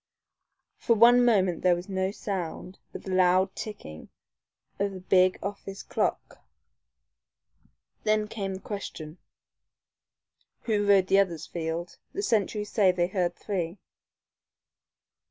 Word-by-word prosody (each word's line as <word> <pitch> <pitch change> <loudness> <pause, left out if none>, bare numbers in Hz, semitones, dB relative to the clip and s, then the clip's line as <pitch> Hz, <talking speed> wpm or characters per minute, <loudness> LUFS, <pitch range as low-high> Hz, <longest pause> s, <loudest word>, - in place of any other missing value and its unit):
For 230 - +2
one 240 +3 +7
moment 190 -7 +2
there 180 -1 +4
was 175 +1 -7
no 190 -1 -1
sound 190 -2 -5
but - - -9
the 190 - -6
loud 185 +1 +3
ticking 140 - -8 0.7
of 200 0 0
the 190 - -7
big 185 0 +3
office 195 0 -6
clock. - - -2 1.6
Then 215 0 +1
came 195 -3 -4
the 190 - -9
question. 175 -6 -7 1.4
"Who 210 -3 0
rode 195 -2 +5
the 195 +1 +4
others, 175 -6 0
Field? 170 +1 -5
The 400 - -3
sentries 210 - 0
say 195 -4 +4
they 175 -1 0
heard 180 -3 -1
three." 180 -3 -3
190 Hz, 120 wpm, -27 LUFS, 180-205 Hz, 1.6 s, one